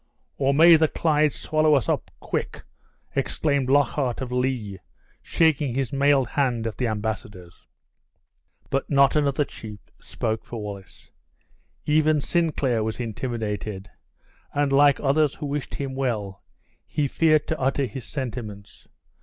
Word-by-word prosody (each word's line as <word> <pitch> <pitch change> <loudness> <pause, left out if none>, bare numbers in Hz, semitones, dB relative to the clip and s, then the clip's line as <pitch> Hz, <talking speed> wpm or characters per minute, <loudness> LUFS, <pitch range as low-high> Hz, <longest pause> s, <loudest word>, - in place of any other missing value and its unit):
"Or 135 0 +3
may 165 +4 +7
the 160 0 +3
Clyde 155 -1 +2
swallow 155 +1 +2
us 135 - 0
up, - - -1
quick!" - - -4 0.5
exclaimed 140 -4 0
Lockhart 140 -2 +1
of 130 -2 -5
Lee, 125 -6 -2 0.4
shaking 150 -6 +1
his 135 -2 -2
mailed 140 -2 +3
hand 125 -6 0
at 115 - -3
the 125 - +1
embassadors. 105 -5 -5 1.0
But 135 0 -1
not 140 -1 +4
another 145 -1 +2
chief 105 -5 -10 0.2
spoke 110 -1 -3
for 120 - -7
Wallace. 100 -2 -9 0.7
Even 155 0 +3
Sinclair 145 -8 0
was 110 +2 -3
intimidated, 105 -4 -4 0.6
and 145 -1 +1
like 140 0 +5
others 145 +1 +2
who 150 - -6
wished 145 0 -4
him 135 -2 -4
well, 110 -8 -3 0.5
he 145 -2 -1
feared 155 +1 +3
to 160 - -2
utter 135 +1 +1
his 130 -1 -7
sentiments. 115 -7 -7
135 Hz, 135 wpm, -24 LUFS, 110-145 Hz, 1.0 s, may